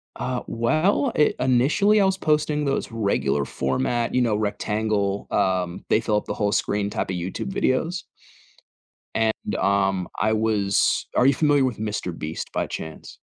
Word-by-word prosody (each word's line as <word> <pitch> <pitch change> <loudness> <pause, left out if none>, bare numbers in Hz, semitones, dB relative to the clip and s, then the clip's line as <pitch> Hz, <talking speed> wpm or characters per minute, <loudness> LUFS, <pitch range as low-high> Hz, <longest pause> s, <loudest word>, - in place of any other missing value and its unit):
Uh, 125 -1 -3
well, 155 - +1
i 150 - +4
initially 150 - +3
I - - +4
was 190 0 +1
posting 150 -2 +1
those 135 -3 -1
regular 75 - 0
format, 65 - -1
you 125 - +3
know, 115 -3 +2
rectangle, 105 -1 -1
um, 90 -2 0
they 110 - +3
fill 110 -1 0
up - - -3
the - - -3
whole 105 -1 0
screen 100 -1 0
type - - -3
of 95 - -2
YouTube 90 - -4
videos. 170 +2 0 1.1
And, 110 -1 -1
um, 95 -2 +1
I 110 0 +2
was 105 -3 +1
are 125 - +4
you 135 - +6
familiar 145 -1 +3
with 125 -4 -2
MrBeast 90 -7 -4
by - - -1
chance? 80 0 -8
110 Hz, 160 wpm, -24 LUFS, 100-135 Hz, 1.1 s, you